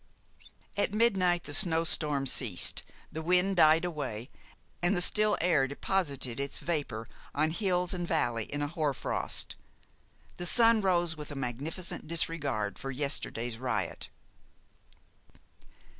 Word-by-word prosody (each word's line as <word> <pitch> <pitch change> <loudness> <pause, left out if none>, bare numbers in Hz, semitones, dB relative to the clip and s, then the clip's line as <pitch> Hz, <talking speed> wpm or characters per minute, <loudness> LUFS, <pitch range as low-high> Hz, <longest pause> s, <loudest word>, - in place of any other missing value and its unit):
At 205 0 0
midnight 190 -6 +3
the 145 - -7
snow 165 -2 +3
storm 150 -4 +1
ceased, 120 -8 +2 0.3
the 160 - -4
wind 180 +3 +2
died 160 +1 +6
away, 135 -8 -4 0.5
and 175 +3 +2
the - - +2
still 210 +3 +4
air 160 -6 +3
deposited 140 -5 -2
its 140 0 -2
vapor 140 -9 -3 0.3
on 155 +2 +2
hills 180 -1 0
and 175 -1 -3
valley 120 -9 0
in 145 0 -3
a - - 0
hoar 150 -3 -1
frost. - - -3 0.8
The 175 - -2
sun 230 +1 +5
rose 175 -4 +2
with 150 -2 -8
a 145 - -6
magnificent 140 +8 -4
disregard 150 -10 -1
for 135 - -5
yesterday's 120 -4 -2
riot. 120 -6 -2
155 Hz, 130 wpm, -30 LUFS, 135-180 Hz, 0.8 s, died